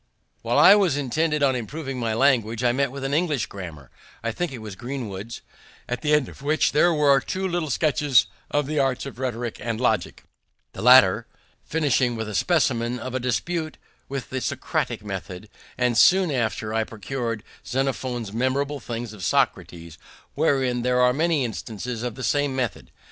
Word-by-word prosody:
While - - 0
I 195 - +9
was 190 -9 +3
intent 150 +2 0
on 135 -2 +3
improving 135 +3 -5
my 115 -2 -1
language, 115 -3 +2
I 120 - +4
met 135 +1 0
with 140 0 -7
an 135 +1 -2
English 150 -6 +1
grammar 80 -9 -9 0.3
(I 115 - -1
think 175 +7 -3
it 130 - -6
was 110 -3 -8
Greenwood's), 115 -3 -6 0.5
at 125 0 -3
the 150 - 0
end 150 -4 +3
of - - -13
which 150 +3 +2
there 175 +4 +4
were 145 -3 +4
two 190 +7 -3
little 175 -4 -2
sketches 140 -3 +3 0.2
of 145 -1 0
the 150 +1 -1
arts 135 -1 0
of 135 -3 -8
rhetoric 120 -3 -3
and 115 -1 -3
logic, 110 -8 0 0.5
the - - -7
latter - - +6 0.4
finishing 135 -6 +1
with 110 -1 -4
a 105 - -6
specimen 125 - +1
of 130 +1 -6
a 130 - -1
dispute 155 +6 -2 0.3
in 135 -1 -3
the 130 0 -2
Socratic 105 - -2
method; 95 0 -6 0.3
and 125 -1 +1
soon 185 +5 +5
after 110 -4 -2
I 110 0 +1
procur'd 115 +1 -4 0.2
Xenophon's 125 -4 -2
Memorable 135 +4 -1
Things 120 -2 -6
of 100 -4 -10
Socrates, 85 -1 -1 0.3
wherein 135 -5 +1
there 125 +1 +1
are 125 0 +4
many 155 -1 +1
instances 115 +1 -5
of 120 -2 -4
the 130 - -7
same 145 -1 +1
method. 125 -5 -3
125 Hz, 175 wpm, -24 LUFS, 115-145 Hz, 0.5 s, I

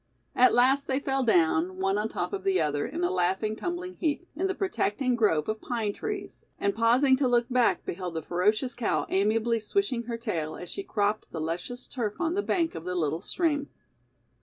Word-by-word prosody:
At 255 +1 +5
last 265 +3 +4
they 265 0 +1
fell 270 -1 0
down, 175 -4 +2
one 195 +2 +1
on 215 +1 -1
top - - -3
of 395 - -3
the 385 -1 +2
other, 145 +3 0
in 320 +8 -4
a 355 - +2
laughing, 190 +4 0
tumbling 355 +6 -4
heap, 325 +2 -1
in 370 +5 0
the 380 - -2
protecting 260 - 0
grove 180 -10 +2
of 215 0 -2
pine 225 -4 -2
trees, 405 - -6 0.2
and 200 - +1
pausing 245 +4 +4
to 265 -1 +2
look 240 -1 +2
back 245 -1 +2
beheld 175 -1 -4
the 160 - -3
ferocious 210 - +1
cow 240 - 0
amiably 225 +4 +2
swishing 245 - -1
her 235 0 -3
tail 170 -10 -3
as 180 - -8
she - - -4
cropped 210 - -1
the 165 - -5
luscious 175 +10 -4
turf 220 -6 -3
on 335 -1 0
the 400 - +1
bank 335 -5 0
of 160 - -7
the 180 +1 -3
little 160 -1 0
stream. 295 - 0
230 Hz, 205 wpm, -28 LUFS, 190-285 Hz, 0.2 s, At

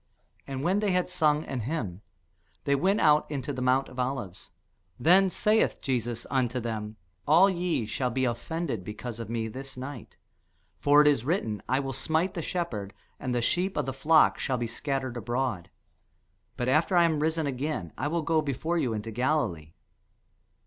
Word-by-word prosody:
And 135 0 -4
when 185 +4 +2
they 205 -3 +1
had 180 0 +1
sung 155 -4 +2
an 135 - -4
hymn, 110 - -3 0.6
they 140 - +1
went 190 +9 +2
out 150 -1 +4
into 145 -1 -3
the 130 - -4
mount 130 +1 +2
of 125 - -10
Olives. 125 -8 -3 0.5
Then 190 +4 +5
saith 215 +4 +2
Jesus 120 -3 -2
unto 125 -1 +1
them, 110 -2 -4 0.3
All 170 +6 +7
ye 175 -9 -1
shall 125 +4 -1
be 130 +2 0
offended 125 - -3
because 110 +3 -7
of 115 -2 -6
me 115 -1 -2
this 130 +4 -8
night: 130 -1 -8 0.6
for 145 +1 +6
it - - +3
is 140 -6 +3
written, 125 - -1
I 130 +2 +2
will 135 -1 -3
smite 160 +7 0
the 170 - -3
shepherd, 125 - -4 0.2
and 125 -1 -2
the 120 - 0
sheep 185 +8 0
of - - 0
the 135 - -3
flock 155 +4 +4
shall 130 -3 -1
be 120 - -2
scattered 130 +1 -3
abroad. 120 -5 -2 0.9
But 120 - -1
after 160 +7 +3
I 170 - +7
am 160 -3 +2
risen 160 +1 0
again, 135 - -3
I 145 - -2
will 165 +1 -1
go 160 +1 +2
before 155 +4 -1
you 125 -7 0
into 110 +1 -5
Galilee. 110 - -1
135 Hz, 180 wpm, -28 LUFS, 120-160 Hz, 0.9 s, All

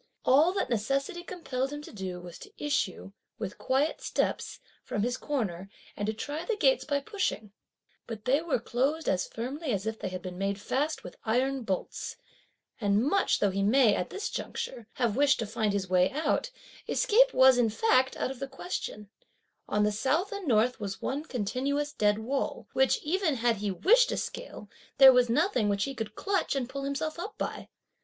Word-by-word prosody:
All 295 +7 +5
that 390 - -1
necessity 275 +9 -1
compelled 280 -7 -3
him 295 0 -6
to - - -11
do 190 -3 -5
was 175 -1 -10
to 410 - -12
issue, 235 -10 -2 0.3
with 210 -3 -6
quiet 275 +4 0
steps, - - -2 0.2
from 205 - -2
his 245 +1 0
corner, 200 - -3 0.3
and 205 - -3
to 220 - 0
try 290 +8 -4
the 450 +5 -1
gates - - +3
by 285 -1 -1
pushing; 270 - -3 0.6
but 220 -2 -7
they 270 +4 +3
were 330 -3 0
closed 270 +7 -1
as 185 -1 +1
firmly 265 +6 -4
as 200 -2 -1
if 220 0 -3
they - - -3
had 185 -1 -6
been 180 0 -6
made 195 +1 -1
fast 290 +9 -1
with 180 - -10
iron 260 +4 +1
bolts; 195 -5 -3 0.6
and 205 0 +2
much 395 +6 +2
though 205 - +2
he 195 +1 -1
may, 220 +2 +5
at 180 - -2
this 405 - -4
juncture, 235 -3 -5
have 235 -5 0
wished 285 +1 +4
to 225 - -2
find 215 0 -1
his 200 -1 -1
way 180 0 +3
out, 310 - 0 0.4
escape - - +4
was, 260 - +6
in 235 -2 +3
fact, 260 - +2
out - - -1
of 270 - -9
the 275 - -3
question; 265 - -6 0.6
on 210 0 +2
the 210 - +3
south 275 - 0
and 400 -4 -5
north 240 +1 +3
was 200 -2 -4
one 275 +3 -2
continuous 275 +4 -2
dead 210 -4 +2
wall, 260 +5 -3
which, 265 0 +3
even 330 -1 +1
had 235 -2 +1
he 205 +1 -2
wished 465 - +4
to - - -1
scale, - - -6 0.3
there 265 -1 +10
was 250 -1 +4
nothing 275 - +2
which 200 0 +1
he 275 - -3
could 220 -4 -5
clutch 395 -6 0
and 260 -3 -2
pull 275 +1 -5
himself 310 +4 -3
up 415 +5 -6
by. - - -4
255 Hz, 195 wpm, -29 LUFS, 210-295 Hz, 0.6 s, there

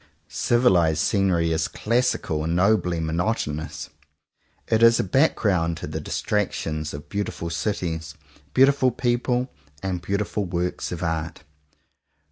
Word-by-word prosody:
Civilized 90 -10 +3
scenery 85 -2 +2
is 80 0 +1
classical 115 -9 0
and 80 +2 -1
nobly 90 -2 +2
monotonous. 80 -1 -2 0.8
It 110 0 +2
is 115 0 +6
a - - +2
background 95 - +2
to - - -6
the 75 +1 -5
distractions 80 -5 -2
of 75 - -9
beautiful 100 -4 -4
cities, 85 -4 -3 0.4
beautiful 135 0 +5
people, 125 +1 -1 0.3
and 95 -2 -2
beautiful 100 +2 -2
works 90 0 -2
of 90 -1 -4
art. 80 -2 -3
90 Hz, 115 wpm, -24 LUFS, 80-110 Hz, 0.8 s, is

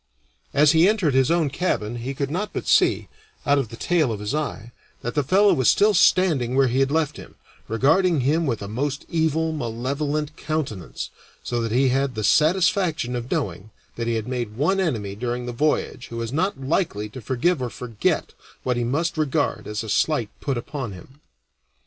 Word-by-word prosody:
As 145 +1 +5
he 165 +4 +5
entered 200 -10 +1
his 130 -1 +3
own 165 -4 +2
cabin 120 -8 -1
he 130 +4 -5
could 140 0 -2
not 205 +6 -3
but - - -4
see, - - +3 0.4
out 145 0 +4
of 125 -6 -2
the 115 - -8
tail 155 +1 +1
of 105 - -4
his 105 +5 -3
eye, 135 -7 -3 0.3
that 120 - -3
the 150 - +2
fellow 195 +7 +4
was 130 -7 +3
still 210 +1 +4
standing 165 -10 +3
where 135 0 +5
he 125 +3 0
had 135 0 +3
left 150 -1 0
him, - - -12 0.3
regarding 155 - +3
him 155 +5 +1
with 115 -6 -2
a - - -5
most 135 +6 -3
evil, 160 0 +1
malevolent 145 +3 -2
countenance, 150 - -4 0.3
so 120 -1 -2
that 115 -1 -2
he 130 +3 +3
had 135 0 0
the 110 - -3
satisfaction 165 - +2
of 120 0 -4
knowing 95 +2 -3 0.3
that 115 0 -3
he 115 - +1
had 110 0 -3
made 120 -4 -3
one 190 +8 +2
enemy 115 - -1
during 120 +3 -3
that 120 - -4
voyage 145 -1 -1
who 115 - -7
was 115 +1 -4
not 175 +7 +1
very 135 -1 -8
likely 135 - 0
to 115 +5 -10
forgive 130 - 0
or 125 - -2
forget 115 -3 -2 0.3
what 125 -1 0
he 120 - 0
must 155 +7 -1
regard 145 -7 0
as 105 +1 -3
a - - -7
slight 120 +1 +1
put 135 -4 -2
upon 125 -2 -5
him. 130 +10 -14
135 Hz, 200 wpm, -23 LUFS, 120-155 Hz, 0.4 s, As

